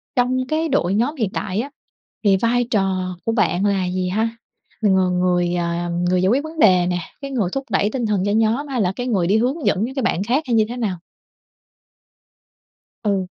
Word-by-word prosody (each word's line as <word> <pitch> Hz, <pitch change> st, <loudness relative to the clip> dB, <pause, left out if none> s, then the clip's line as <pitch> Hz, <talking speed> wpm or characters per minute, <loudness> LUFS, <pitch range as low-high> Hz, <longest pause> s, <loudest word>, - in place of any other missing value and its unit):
trong 255 Hz, +1 st, +1 dB
cái 315 Hz, +1 st, 0 dB
đội 195 Hz, -9 st, +1 dB
nhóm 245 Hz, +9 st, +1 dB
hiện 220 Hz, -9 st, -1 dB
tại 190 Hz, -1 st, -2 dB
á, 275 Hz, -, -6 dB, 0.5 s
thì 195 Hz, -2 st, +4 dB
vai 240 Hz, +3 st, +1 dB
trò 185 Hz, -3 st, 0 dB
của 225 Hz, -, +1 dB
bạn 200 Hz, -4 st, +1 dB
là 195 Hz, -2 st, +1 dB
gì 180 Hz, 0 st, -2 dB
ha? 220 Hz, +4 st, 0 dB, 0.5 s
Mình 200 Hz, -3 st, +4 dB
là 190 Hz, -, +3 dB
người, 180 Hz, -1 st, +1 dB
ờ, 170 Hz, 0 st, -2 dB
người 175 Hz, +1 st, +1 dB
giải 185 Hz, -, +2 dB
quyết 270 Hz, +6 st, +2 dB
vấn 315 Hz, 0 st, -8 dB
đề 180 Hz, -6 st, +5 dB
nè, 180 Hz, 0 st, 0 dB, 0.2 s
cái 275 Hz, -1 st, -6 dB
người 215 Hz, -9 st, 0 dB
thúc 270 Hz, -, -2 dB
đẩy 205 Hz, -, +2 dB
tinh 245 Hz, -4 st, -2 dB
thần 205 Hz, -3 st, 0 dB
cho 205 Hz, -, +1 dB
nhóm 225 Hz, +6 st, +1 dB
hay 255 Hz, -5 st, -1 dB
là 180 Hz, -1 st, +1 dB
cái 245 Hz, -, -4 dB
người 195 Hz, -8 st, +1 dB
đi 205 Hz, +4 st, +3 dB
hướng 265 Hz, +7 st, -1 dB
dẫn 205 Hz, +3 st, +2 dB
những 265 Hz, -, -7 dB
cái 265 Hz, -, -1 dB
bạn 195 Hz, -3 st, 0 dB
khác 260 Hz, +8 st, +1 dB
hay 240 Hz, -, 0 dB
như 220 Hz, -, +4 dB
thế 245 Hz, -, -5 dB
nào? 205 Hz, -7 st, -2 dB, 2.1 s
Ừ. 195 Hz, -3 st, 0 dB
210 Hz, 220 wpm, -21 LUFS, 185-245 Hz, 2.1 s, đề